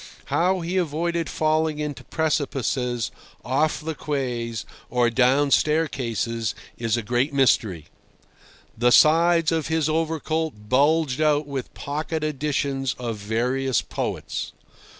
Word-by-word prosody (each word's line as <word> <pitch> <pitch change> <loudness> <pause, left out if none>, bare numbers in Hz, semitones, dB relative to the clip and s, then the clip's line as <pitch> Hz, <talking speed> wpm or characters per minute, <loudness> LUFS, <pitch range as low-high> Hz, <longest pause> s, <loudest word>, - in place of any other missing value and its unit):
How 185 +2 +2
he 175 +3 -2
avoided 170 0 -1
falling 155 0 +1
into 150 -2 -4
precipices, 135 -6 -1 0.3
off 150 +4 +1
the 160 +1 -3
quays, 125 -6 -3 0.2
or 120 -1 +2
down 135 +4 +3
staircases 120 -8 0 0.2
is 115 -1 0
a 120 - -2
great 125 +6 0
mystery. 105 - +2 0.9
The 120 +2 +3
sides 165 +3 +5
of 160 -2 0
his 160 -2 +1
overcoat 160 0 -1
bulged 145 +2 +2
out 150 -1 +3
with 140 -3 -5
pocket 155 +2 -3
editions 140 -2 -1
of 120 -3 -4
various 120 +4 0
poets. - - -4
145 Hz, 115 wpm, -24 LUFS, 125-160 Hz, 0.9 s, sides